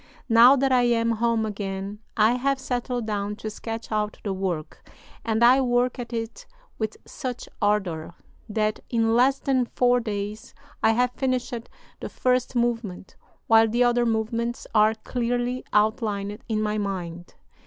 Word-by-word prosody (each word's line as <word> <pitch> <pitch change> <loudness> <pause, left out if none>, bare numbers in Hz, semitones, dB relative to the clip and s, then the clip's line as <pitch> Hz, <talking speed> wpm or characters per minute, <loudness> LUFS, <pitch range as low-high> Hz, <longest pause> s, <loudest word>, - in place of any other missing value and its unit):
Now 235 +4 +8
that 270 0 +1
I 250 -1 +5
am 230 -1 +2
home 230 0 +1
again 200 -1 -5 0.2
I 215 +1 +5
have 270 +3 +1
settled 245 -2 -2
down 205 -1 -2
to 215 0 -6
sketch 225 +1 -6
out 210 -1 -1
the 200 - -2
work, 185 -5 -4 0.3
and 225 -1 +1
I 255 +3 +7
work 250 0 +1
at 240 0 -6
it 225 -1 -5 0.3
with 220 -1 -3
such 255 -4 -6
ardor 185 -6 0 0.3
that 215 0 0
in 225 -1 +2
less 265 +3 +4
than 260 -3 0
four 245 0 +2
days 210 -1 -5 0.3
I 220 - +4
have 250 +2 +2
finished 255 -1 -2 0.5
the - - -6
first 255 0 0
movement, 230 -6 -2 0.3
while 225 0 +6
the 240 +3 +2
other 240 0 +2
movements 230 +2 -1
are 215 0 +4
clearly 245 +2 -2
outlined 210 -1 0
in 215 -1 0
my 210 0 -1
mind. 175 -4 -5
225 Hz, 155 wpm, -25 LUFS, 210-245 Hz, 0.5 s, Now